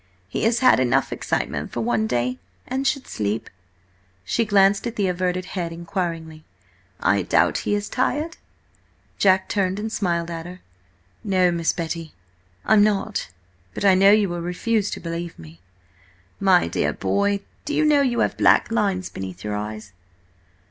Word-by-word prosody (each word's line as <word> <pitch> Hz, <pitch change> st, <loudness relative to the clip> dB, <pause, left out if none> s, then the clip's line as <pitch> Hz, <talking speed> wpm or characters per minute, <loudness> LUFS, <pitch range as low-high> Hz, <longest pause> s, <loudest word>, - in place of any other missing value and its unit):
"He 95 Hz, -, -2 dB
has 230 Hz, +2 st, +2 dB
had 255 Hz, -, +6 dB
enough 125 Hz, -1 st, +1 dB
excitement -, -, -2 dB
for 120 Hz, -, -3 dB
one 115 Hz, -1 st, 0 dB
day, 125 Hz, +2 st, -1 dB, 0.3 s
and 265 Hz, +1 st, -2 dB
should 275 Hz, -2 st, 0 dB
sleep." 105 Hz, +1 st, -3 dB, 0.7 s
She 230 Hz, -, 0 dB
glanced 200 Hz, +1 st, +3 dB
at 235 Hz, -, -5 dB
the 205 Hz, -, 0 dB
averted 180 Hz, 0 st, -1 dB
head 175 Hz, -3 st, -3 dB
inquiringly. 165 Hz, -2 st, -4 dB, 0.6 s
"I 100 Hz, 0 st, +2 dB
doubt -, -, +2 dB
he 205 Hz, -, +3 dB
is 205 Hz, 0 st, -3 dB
tired?" 305 Hz, +5 st, -1 dB, 0.8 s
Jack 190 Hz, -1 st, +4 dB
turned 190 Hz, -1 st, 0 dB
and 220 Hz, +1 st, -4 dB
smiled 170 Hz, -5 st, -1 dB
at 165 Hz, 0 st, -6 dB
her. 180 Hz, +1 st, -10 dB, 0.6 s
"No, 185 Hz, -3 st, +2 dB
Miss 170 Hz, -1 st, +1 dB
Betty, 165 Hz, -1 st, -5 dB, 0.5 s
I'm 210 Hz, -1 st, +5 dB
not. 210 Hz, 0 st, 0 dB, 0.5 s
But -, -, -2 dB
I 195 Hz, -, +7 dB
know 195 Hz, +1 st, +6 dB
you 210 Hz, 0 st, +5 dB
will 175 Hz, -1 st, -4 dB
refuse 205 Hz, +4 st, -1 dB
to -, -, -5 dB
believe 170 Hz, 0 st, -5 dB
me." 80 Hz, +1 st, -13 dB, 0.8 s
"My 190 Hz, -3 st, +4 dB
dear -, -, -1 dB
boy, 200 Hz, 0 st, 0 dB, 0.2 s
do 300 Hz, -, -2 dB
you 310 Hz, -, +3 dB
know 295 Hz, -2 st, +4 dB
you 245 Hz, -4 st, +1 dB
have -, -, +1 dB
black -, -, +4 dB
lines 200 Hz, -5 st, 0 dB
beneath 95 Hz, -1 st, -8 dB
your 105 Hz, 0 st, -3 dB
eyes?" 105 Hz, -1 st, -6 dB
185 Hz, 160 wpm, -23 LUFS, 165-205 Hz, 0.8 s, I